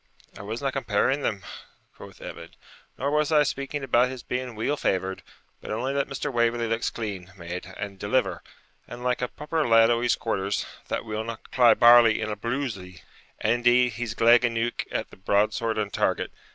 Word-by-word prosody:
'I - - -9
wasna 115 +7 -3
comparing 130 +1 0
them,' 100 -7 -2 0.5
quoth - - -13
Evan, - - -8 0.5
'nor 140 +2 -1
was 150 0 +1
I 150 -1 +5
speaking 140 +1 -3
about 125 -1 +3
his 130 -2 -8
being 125 -1 -4
weel 115 +7 -1
favoured; 95 -7 -1 0.4
but - - -9
only 125 +6 -2
that 140 0 0
Mr. 135 0 -4
Waverley 120 0 +1
looks 115 0 -1
clean 100 -5 -6
made 90 +1 -7
and 100 -2 -6
deliver, 125 +7 0 0.5
and 120 +1 -9
like 125 0 0
a 125 - 0
proper 150 +4 -2
lad 115 0 +6
o' 120 0 +1
his 120 - +2
quarters, 100 -3 -2 0.2
that - - -3
will 110 0 -3
not 115 0 -8
cry 120 -2 +6
barley 120 -2 +7
in 110 -1 -2
a - - -2
brulzie. 105 -6 -4 0.4
And, - - +2
indeed, 120 0 +3
he's 115 0 -4
gleg 120 +2 +5
aneuch 115 0 -1
at - - -3
the - - -14
broadsword 105 +3 0
and 105 -2 -2
target. - - 0
115 Hz, 185 wpm, -26 LUFS, 105-125 Hz, 0.5 s, barley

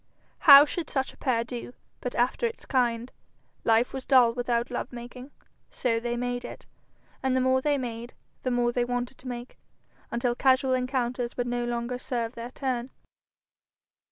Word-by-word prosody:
How 280 +1 +12
should 325 +2 -4
such 265 -1 -2
a - - -21
pair 240 -4 +1
do, 245 0 -7 0.3
but 250 - -5
after 250 - +1
its 460 - -8
kind? 240 -2 0 0.5
Life 230 +2 +3
was 265 -1 -4
dull 250 -4 +5
without 240 0 -1
love 245 - -4
making, 245 +2 -9 0.4
so 230 -2 0
they 240 +1 -3
made 245 0 -2
it. - - -9 0.6
And 260 -1 +1
the - - +3
more 260 0 +3
they 290 +1 +1
made, 240 -2 -6 0.3
the 255 - -1
more 245 -1 +1
they 245 0 0
wanted 245 +1 -3
to 255 - -11
make, 245 0 -7 0.5
until 240 +1 0
casual 260 +1 +3
encounters 250 -1 -1
would 245 - 0
no 240 0 -1
longer 240 +1 -3
serve 240 -3 -3
their 235 0 -7
turn. 255 -1 -3
245 Hz, 170 wpm, -27 LUFS, 240-260 Hz, 0.6 s, How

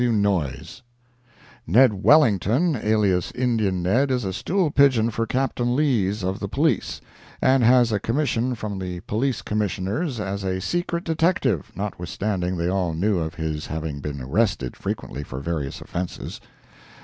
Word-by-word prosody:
W. 120 -1 +2
Noyes: 95 - -1 0.9
Ned 115 +7 +5
Wellington, 135 - +4
alias 105 -5 +1
"Indian 110 -8 0
Ned," 120 +10 +2
is 125 -4 0
a 95 - -2
stool 180 - 0
pigeon 130 -6 +4
for 115 +1 -2
Captain 125 -2 0
Lees, 110 -9 +1
of 95 +1 -2
the - - -3
police, - - 0 0.4
and 130 -1 +3
has 120 0 +5
a 105 - +1
commission 125 +1 0
from 105 -3 -5
the 90 -2 -5
Police 120 +5 -1
Commissioners, 105 - -2
as 100 -1 -3
a 95 -1 -1
secret 170 - -2
detective, 160 -5 0
notwithstanding 95 -1 -3
they 85 0 -1
all 90 -3 0
knew 95 +3 +1
of 80 0 -4
his 80 -2 -3
having 80 -2 -4
been 70 -1 -5
arrested 70 - 0
frequently 70 - -5
for 65 -1 -7
various 75 -2 -4
offenses. 90 0 -5
105 Hz, 150 wpm, -23 LUFS, 90-125 Hz, 0.9 s, Ned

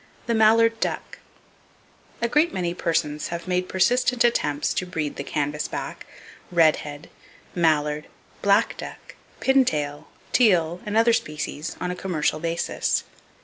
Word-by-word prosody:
The 235 - 0
Mallard 225 +1 +4
Duck.—A 235 - -7
great 300 +7 +3
many 175 -2 -2
persons 160 -4 -1
have 170 +1 -6
made 180 0 0
persistent 245 +5 +2
attempts 150 -11 +1
to 185 - -2
breed 155 -5 -3
the - - -5
canvasback, 145 +1 -3 0.4
redhead, 155 -3 +2 0.5
mallard, 150 -3 +1 0.3
black 200 +3 +3
duck, - - -9 0.3
pintail, 155 - +1 0.3
teal 180 -7 +3
and 210 +1 0
other 230 +1 +5
species, 150 -4 -3
on 180 - -2
a - - -4
commercial 160 -5 -1
basis. 165 +1 -1
175 Hz, 120 wpm, -24 LUFS, 150-225 Hz, 0.5 s, other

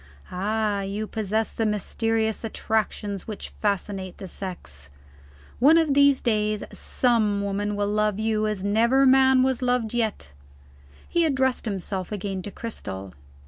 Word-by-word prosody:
Ah, 205 +2 0
you 200 +2 -3
possess 220 0 -2
the 225 - -2
mysterious 220 +1 0
attractions 215 -3 -2
which 215 -2 -6
fascinate 195 -2 -3
the 195 - -8
sex. 70 - -7 0.7
One 295 +7 +6
of 320 -4 +3
these 280 -1 +4
days, 215 -2 +1
some 215 -5 +1
woman 205 +1 -2
will 205 0 0
love 210 -1 +1
you 215 0 0
as 210 -3 -3
never 235 +6 +3
man 265 0 +5
was 260 -1 0
loved 245 -3 0
yet." 220 - -2 0.7
He 345 - +2
addressed 265 -5 +1
himself 190 -2 -3
again 195 -2 -3
to 205 - -6
Cristel. 95 - -6
215 Hz, 140 wpm, -25 LUFS, 200-235 Hz, 0.7 s, One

